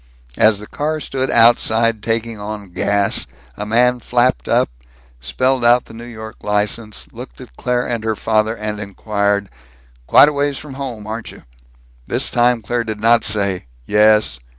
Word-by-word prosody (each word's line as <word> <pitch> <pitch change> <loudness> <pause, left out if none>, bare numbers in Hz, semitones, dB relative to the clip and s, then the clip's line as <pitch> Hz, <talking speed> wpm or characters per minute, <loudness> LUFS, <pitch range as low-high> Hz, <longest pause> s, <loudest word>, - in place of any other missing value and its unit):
As 110 -1 +5
the 105 - -8
car 155 +6 -3
stood 135 -2 -3
outside 115 -1 +3
taking 115 0 -2
on 105 -2 -7
gas, 100 +1 0 0.3
a 105 - -5
man 125 +3 +3
flapped 120 - 0
up, - - +2 0.5
spelled 130 - 0
out 120 +1 +4
the - - -14
New 115 +1 -9
York 110 -2 -9
license, 105 - -1
looked - - -10
at - - -13
Claire 125 - -1
and 115 -2 -3
her 110 -1 -1
father, 110 +1 0
and 105 -1 -4
inquired, 100 0 -1 0.6
"Quite 145 - +7
a - - -4
ways 140 -1 -1
from 150 -3 -9
home, 130 -6 -6
aren't 110 +1 -6
you?" - - -15 0.6
This - - 0
time 120 -1 +2
Claire 120 +2 -1
did 110 -2 -5
not 115 +1 +4
say 100 - 0 0.2
"Yes!" 105 - +3
110 Hz, 165 wpm, -18 LUFS, 105-120 Hz, 0.6 s, Quite